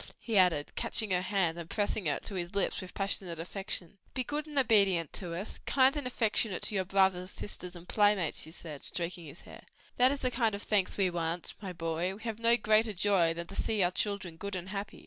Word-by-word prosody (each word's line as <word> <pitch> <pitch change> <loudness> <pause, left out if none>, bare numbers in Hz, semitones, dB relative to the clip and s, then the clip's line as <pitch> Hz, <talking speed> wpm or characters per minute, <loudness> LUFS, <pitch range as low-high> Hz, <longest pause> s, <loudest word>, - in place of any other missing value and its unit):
he 230 - -3
added, 180 -6 +3
catching 215 -3 0
her 180 -1 +2
hand 180 -3 0
and 170 -1 -8
pressing 205 -3 -1
it 145 - -1
to - - -4
his 175 0 -4
lips 200 - +1
with 185 - -9
passionate 195 -3 -1
affection. 190 +1 -3 0.2
"Be 255 - 0
good 295 +4 -3
and 295 -2 -7
obedient 200 - +4
to 175 -4 -4
us, 190 +5 -4
kind 265 +1 +4
and 290 -4 -2
affectionate 220 -5 0
to - - +1
your 190 -2 0
brothers, 190 -1 +2
sisters 180 -3 -6
and 175 0 -11
playmates," 205 -6 +3
she 160 - -6
said, 155 -4 -7
stroking 175 0 -4
his 150 - -11
hair: - - -12 0.4
"that 255 +1 +6
is 280 - -3
the 255 - 0
kind 230 -4 +1
of 200 - -7
thanks 200 -3 +2
we 190 -3 +2
want, 170 0 -3
my 195 -3 -5
boy; 165 +2 -2
we 215 - -13
have 225 -2 -4
no 230 +1 +5
greater 215 0 +3
joy 185 -3 +3
than 170 0 -4
to 195 - -9
see 215 -2 +1
our 175 - +2
children 190 -4 -2
good 200 +2 -5
and 180 0 -5
happy." 200 +1 -5
195 Hz, 225 wpm, -31 LUFS, 175-215 Hz, 0.4 s, that